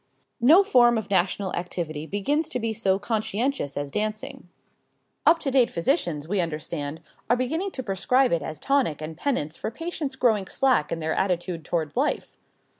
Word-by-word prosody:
No 310 +11 +7
form 240 - +5
of 220 -2 -5
national 190 +1 +1
activity 165 -3 -4
begins 290 - 0
to 250 - -2
be 225 -1 -1
so 195 -3 +1
conscientious 220 - -2
as 145 -1 -3
dancing. 215 -3 -4 0.8
Up 335 - +7
to 275 - -1
date 255 -3 +4
physicians, 170 - 0
we 195 +1 +1
understand, 155 -1 -4 0.3
are 240 - +5
beginning 320 +10 -1
to 260 -8 -6
prescribe 245 +6 +2
it 170 - +1
as 155 -1 -6
tonic 270 - +1
and 155 +1 -6
penance 165 - -1
for - - -4
patients 315 +1 -4
growing 220 -7 +2
slack 260 - +2
in 165 - -2
their 160 0 -1
attitude 175 -3 -1
toward 160 -2 -2
life. 275 +5 -1
205 Hz, 170 wpm, -25 LUFS, 165-260 Hz, 0.8 s, No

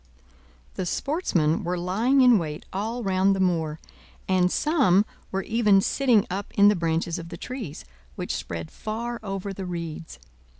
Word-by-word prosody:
The 185 - -2
sportsmen 175 - 0
were 180 +1 -1
lying 220 +10 +2
in 245 -4 +6
wait 155 -3 -5
all 225 +5 -3
round 195 0 +2
the - - -3
moor, 165 -4 0 0.5
and 180 -1 +3
some 255 - +3 0.3
were 195 0 -1
even 215 -3 +3
sitting 235 0 +3
up 195 +2 -5
in 200 0 +7
the 210 - +3
branches 165 0 -1
of 165 0 -8
the 170 - -7
trees, 225 - -7 0.3
which - - -3
spread 85 -2 -5
far 235 +2 -4
over 195 -1 -4
the 190 -1 -6
reeds. 165 - -6
190 Hz, 160 wpm, -25 LUFS, 170-220 Hz, 0.5 s, in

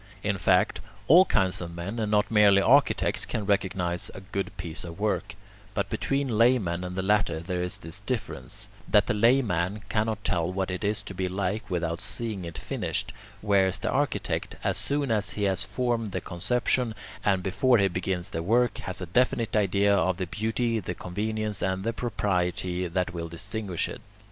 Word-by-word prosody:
In 100 -2 0
fact, 90 +1 +3 0.3
all 175 +6 +8
kinds 95 - +1
of 85 -1 -6
men, 100 +7 -4
and 110 -2 -1
not 105 +1 +2
merely 105 -2 +6
architects, 135 +8 +3
can 105 - -3
recognize 95 -3 0
a 95 - -7
good 95 0 -3
piece 85 -2 -5
of 85 +1 -8
work, 105 0 -1 0.4
but - - -1
between 135 -5 0
laymen 105 -8 +3
and 90 0 -5
the 95 - -1
latter 100 -5 +2
there 90 +2 -3
is 90 0 -2
this 80 +5 -7
difference, 105 - -5 0.2
that - - +4
the - - 0
layman 105 -4 +2
cannot 110 -1 -1
tell 85 0 0
what 95 0 -2
it 90 - -4
is 105 +1 0
to 100 - -6
be 95 0 -1
like 100 +3 -2
without 85 -2 -2
seeing 105 -3 -4
it 85 -1 -7
finished, - - -3 0.3
whereas 95 -2 +3
the - - -2
architect, - - -1
as - - +1
soon 140 -3 -1
as 105 -2 +2
he 105 - -3
has 95 -1 +2
formed 120 -5 -1
the - - 0
conception, 120 +5 0 0.3
and 95 -3 +2
before 120 +7 +3
he 100 -2 +4
begins 90 -1 -3
the 80 - -2
work, 120 +7 +2
has 95 0 -5
a - - -2
definite 115 +4 +1
idea 100 0 +3
of 90 0 +1
the 95 - -2
beauty, 110 +4 -1
the 90 -3 -5
convenience, 105 +3 -3
and 95 0 -1
the 115 +2 -1
propriety 90 -5 -1
that 90 +1 -1
will 85 -1 -4
distinguish 95 +2 -4
it. - - -8
100 Hz, 185 wpm, -27 LUFS, 90-110 Hz, 0.4 s, all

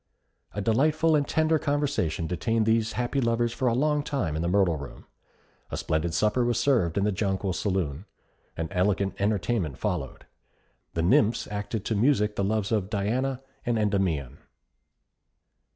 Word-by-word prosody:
A 105 - -1
delightful 155 +9 +3
and 145 -2 +1
tender 160 0 +2
conversation 140 - -1
detained 110 +7 0
these 110 0 +2
happy 125 +3 -1
lovers 115 0 +1
for 130 - -1
a 115 - +2
long 150 +3 +2
time 120 - -2
in 80 - -1
the 85 - -1
Myrtle 90 -2 +3
Room. 70 -1 -10 0.6
A - - -4
splendid 80 +2 -1
supper 105 +7 +2
was 120 -1 +1
served 110 - +2
in 100 - +2
the 105 - +2
Jonquil 95 -1 -1
Saloon. 90 -3 -2 0.5
An 80 - -2
elegant 95 +1 +1
entertainment 100 - 0
followed. - - -3 0.7
The 85 - 0
nymphs 105 +6 +3
acted 105 +1 -4
to 110 - 0
music 105 -2 +2
the 100 - 0
loves 105 +1 0
of 105 -4 0
Diana 125 +6 -1 0.2
and 120 -1 0
Endymion. 95 - 0
105 Hz, 155 wpm, -27 LUFS, 95-120 Hz, 0.7 s, delightful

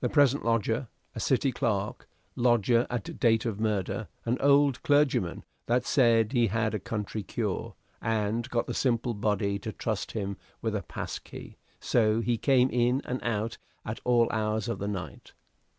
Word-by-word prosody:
Present 145 -2 +4
lodger, 115 +2 0 0.3
a - - -6
City - - +2
clerk; - - -2 0.3
lodger 120 -1 +3
at 120 -4 -4
date 115 -1 +3
of 110 -3 -2
murder, 110 0 -1 0.2
an 120 +2 0
old 140 -1 +4
clergyman 145 - +2 0.2
that 120 +1 +2
said 115 -4 +3
he 120 -3 +3
had 110 +1 0
a 105 - -1
country 105 +2 -4
cure, - - -3 0.3
and 110 +2 -1
got 120 -2 0
the - - -4
simple 120 -2 +1
body 100 -1 0
to 110 +2 -5
trust 110 -1 -3
him 100 -3 -3 0.2
with 110 -2 -2
a 100 - -1
pass - - -5
key: - - -11 0.2
so 110 -1 +2
he 120 +1 +1
came 130 +1 +3
in 125 +3 +2
and 125 +1 -3
out 115 0 -2 0.3
at 110 0 -4
all 120 -2 +4
hours 110 -1 -1
of 115 - -3
the 100 - -3
night. 100 -3 -6
115 Hz, 165 wpm, -28 LUFS, 105-125 Hz, 0.3 s, Present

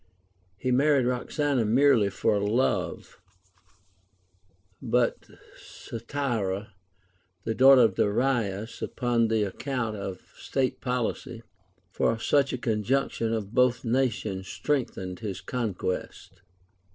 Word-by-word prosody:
He 125 - -1
married 140 0 +3
Roxana 125 +1 0
merely 115 -2 +4
for 100 +1 +1
love; 110 +6 -1 1.6
but 120 -1 0 0.3
Statira, 115 -5 -4 0.7
the 110 - -1
daughter 130 +2 +7
of 110 -4 +4
Darius, 110 -1 0
upon 120 -3 0
the 110 -1 +1
account 115 +2 -3
of 95 -2 -7
state 130 -2 -2
poHcy, 125 -1 -3 0.5
for 115 - +1
such 140 +4 +2
a - - -2
conjunction 115 +1 0
of 110 -2 -3
both 125 -1 +2
nations 115 -6 -1
strengthened 115 -10 -2
his 100 -5 -5
conquest. 95 -3 -4
115 Hz, 100 wpm, -27 LUFS, 105-130 Hz, 1.6 s, daughter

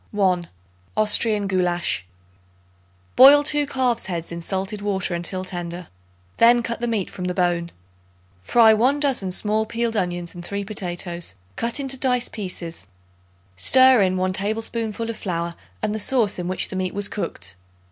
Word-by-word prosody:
_ - - -35
1. 185 -4 +1 0.5
Austrian 215 0 +3
Goulasch. 175 - 0 1.1
Boil 285 +2 +8
2 295 -1 +3
calves' 250 -6 0
heads 170 -3 -4
in 170 0 -6
salted 195 +4 -3
water 195 -3 -2
until 180 +2 -3
tender; 175 -1 -6 0.5
then 240 +1 +5
cut 235 0 -4
the 240 - -2
meat 220 -5 -1
from 180 - -7
the 180 0 -2
bone. 175 -2 0 0.7
Fry 220 - +5
1 255 +7 +2
dozen 265 -10 0
small 215 +3 +2
peeled 230 0 -2
onions 175 -3 -2
and 175 - -9
3 200 +3 -4
potatoes, 175 - -4 0.2
cut 235 +4 -1
into 270 -1 -2
dice 250 -2 +1
pieces; 175 - -5 0.7
stir 260 - +6
in 185 -1 +1
1 185 0 0
tablespoonful 220 +2 -3
of 230 - -5
flour 170 -2 -3 0.3
and 210 - 0
the 215 - -3
sauce 220 -4 +1
in 175 - -4
which 185 - -2
the - - -6
meat 185 0 -3
was 205 0 0
cooked. 90 - -5
200 Hz, 160 wpm, -22 LUFS, 175-230 Hz, 1.1 s, Boil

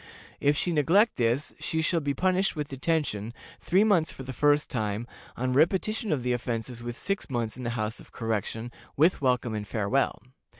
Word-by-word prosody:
If 145 +1 +3
she 175 - +1
neglect 170 - +3
this 120 +4 +1
she 160 0 -1
shall 170 +1 +2
be 145 -2 -2
punished 185 +4 +1
with 150 -2 -3
detention, 135 -6 -1 0.2
three 190 +4 +3
months 190 -7 +3
for 135 - -8
the 130 +1 -6
first 145 +2 +3
time, 110 -2 -2 0.3
on 125 +1 0
repetition 195 - +2
of 140 -5 0
the 125 0 +1
offense 120 0 -3
with 120 0 -5
six 195 -4 -3
months 120 -4 -2
in 130 - -8
the 120 - -2
House 110 0 -2
of - - -14
Correction, 115 +1 -3 0.3
with 160 +4 +4
welcome 125 -3 +1
and 105 -1 -4
farewell. 110 +6 0
130 Hz, 185 wpm, -28 LUFS, 115-160 Hz, 0.3 s, with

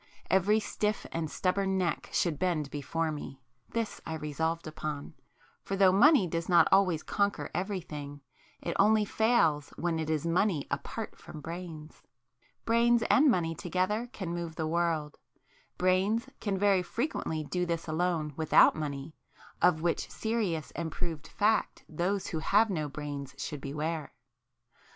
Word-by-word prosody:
Every 195 +4 +4
stiff 210 0 -2
and 165 -2 -2
stubborn 190 +2 0
neck 175 -4 -1
should 160 -5 0
bend 160 -6 0
before 155 +3 -2
me;—this 135 - -6
I 160 - -4
resolved 160 +2 -2
upon; 155 -2 -5 0.5
for 195 - -3
though 195 -1 +6
money 240 - +6
does 165 +1 -3
not 175 -1 +6
always 185 -5 +4
conquer 200 0 -1
everything, 155 -7 -4 0.4
it - - -2
only 215 +1 +5
fails 185 -11 +2
when 170 -1 -1
it 160 -1 -3
is 155 0 0
money 170 -2 +1
apart - - -4
from 155 - -10
brains. 165 -1 -8 0.6
Brains 235 0 +4
and 285 +1 +6
money 170 -8 +1
together 185 +8 -1
can 190 -9 -5
move 170 -2 -4
the 160 - -2
world,—brains 175 - -1
can 200 -3 -1
very 195 -1 +3
frequently 180 - -2
do 180 +4 -2
this 170 -1 -2
alone 160 -2 0
without 160 0 +5
money, 145 -1 -4 0.5
of 160 -3 +4
which 170 -1 0
serious 210 -9 -2
and 165 0 -4
proved 160 -3 -4
fact 215 +2 +1
those 180 +5 -1
who 160 - -2
have 210 +6 +3
no 155 -5 -2
brains 140 -2 -6
should 145 0 -5
beware! 150 +3 -3
170 Hz, 140 wpm, -30 LUFS, 155-195 Hz, 0.6 s, though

